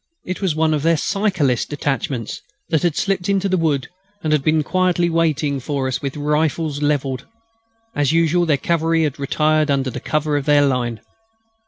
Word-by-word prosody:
It 185 +2 -4
was 185 -6 0
one 160 0 +2
of 150 - 0
their 165 +1 +3
cyclist 170 - 0
detachments 135 -5 -3 0.3
that 160 - +2
had 175 -4 +1
slipped 195 -2 -1
into 195 0 +1
the 190 - +1
wood 155 -6 0 0.4
and 155 -1 +1
had 150 - +3
been 155 0 +2
quietly 175 0 +1
waiting 155 -4 +1
for 135 0 -2
us 130 - -2
with 140 0 -4
rifles 150 0 0
levelled. 140 -3 -1 0.7
As 145 -1 +2
usual, 165 +1 +2
their 150 -3 +3
cavalry 165 +2 +1
had 150 -2 -2
retired 155 +2 +1
under 135 -2 +1
cover 150 -1 0
of 140 - -3
their 145 -1 +4
line. 120 -4 -1
150 Hz, 175 wpm, -20 LUFS, 140-165 Hz, 0.7 s, their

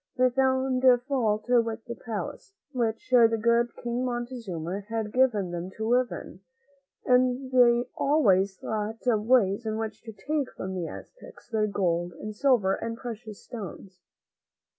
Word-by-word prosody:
They 255 0 +4
found 260 0 +1 0.2
fault 225 -7 0
with 230 -2 +1
the 235 - -5
palace, 230 - -6 0.2
which 235 -1 -2
the 230 -2 +6
good 235 +1 +2
King 240 +1 -1
Montezuma 235 -8 -4
had 225 -2 -3
given 225 -8 +2
them 175 +1 -4
to 220 0 -2
live 245 +1 +3
in, 180 - -8 0.7
and 255 +1 +2
they 245 -1 +4
always 200 -10 +3
thought 220 +2 -4
of 220 -3 +1
ways 225 -4 +3
in 220 -1 -2
which 220 -1 -5
to 225 - -9
take 275 +7 -3
from 190 0 -4
the 180 -3 -3
Aztecs - - -12
their 220 -2 +1
gold 175 -3 -1
and 215 +5 -7
silver 230 -7 +3
and 230 +2 -4
precious 220 -4 -8
stones. 195 -4 -9
230 Hz, 150 wpm, -27 LUFS, 210-250 Hz, 0.7 s, the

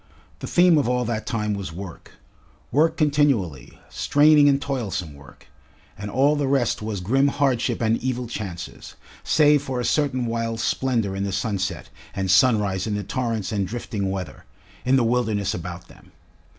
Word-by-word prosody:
The - - -6
theme 175 -3 +5
of 135 - 0
all 125 0 0
that 110 -1 -3
time 105 -3 -1
was 100 -4 -5
work, 90 +1 -9 0.6
work 160 +3 +2
continually, 140 - 0
straining 145 0 +4
and 140 -1 +3
toilsome 100 - -3
work, 70 0 -16 0.5
and 105 +1 -6
all 140 +7 +3
the 145 -2 -1
rest 135 -5 +1
was 105 -3 -4
grim 135 +9 +2
hardship 135 -5 0
and 115 +1 +1
evil 125 -1 -2
chances, 100 -7 -7 0.3
save 150 -2 +4
for 130 -3 -4
a 120 - -2
certain 135 -5 +1
wild 115 -1 -2
splendour 115 -6 0
in 100 - -2
the 100 - -2
sunset 100 -2 -2 0.3
and 95 -1 0
sunrise 100 -2 +3
in 105 - -1
the 105 - -3
torrents 115 -3 -2
and 100 -3 -1
drifting 105 -2 -3
weather, 95 -4 -6 0.4
in 130 +1 +3
the 130 - +3
wilderness 115 -4 0
about 85 0 -7
them. - - -19
115 Hz, 165 wpm, -23 LUFS, 100-135 Hz, 0.6 s, theme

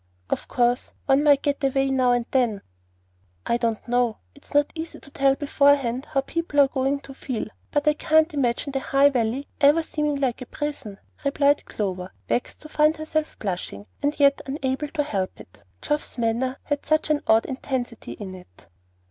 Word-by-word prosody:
Of - - -1
course, 245 0 +1
one 275 +1 +4
might 285 -2 +5
get 285 0 -1
away 270 0 +2
now 255 -2 +3
and 245 -1 +1
then 240 -6 +1 0.4
" 90 - -42 0.3
"I 235 - +2
don't 230 -2 -2
know. 245 -2 +1 0.2
It's 285 - -13
not 290 0 +4
easy 325 0 -6
to 280 - -16
tell 275 0 +3
beforehand 280 -2 +2
how 270 - +1
people 300 +1 -2
are 280 - +7
going 270 +1 -1
to 275 - -11
feel; 260 -3 -4 0.2
but 290 0 0
I 300 - +6
can't 315 +2 +3
imagine 275 0 0
the 270 - -1
High 275 +2 +4
Valley 250 +2 -1
ever 295 +3 +5
seeming 300 -2 -1
like 265 -3 -1
a 255 - -7
prison," 275 -10 -5 0.3
replied 285 0 +2
Clover, 185 -3 -4 0.2
vexed 245 - -2
to - - -8
find 305 +1 +3
herself 310 0 -2
blushing, 180 - -4 0.2
and 290 +1 -1
yet 280 -1 +4
unable 270 +1 -2
to 295 0 -1
help 195 -10 -3
it, 90 - -15 0.2
Geoff's 295 -2 -1
manner 240 +3 0
had 290 -2 -2
such 310 0 +1
an 295 - +2
odd 220 +1 +5
intensity 260 -3 -4
in 195 -3 -8
it. 180 - -15
275 Hz, 185 wpm, -24 LUFS, 240-290 Hz, 0.4 s, are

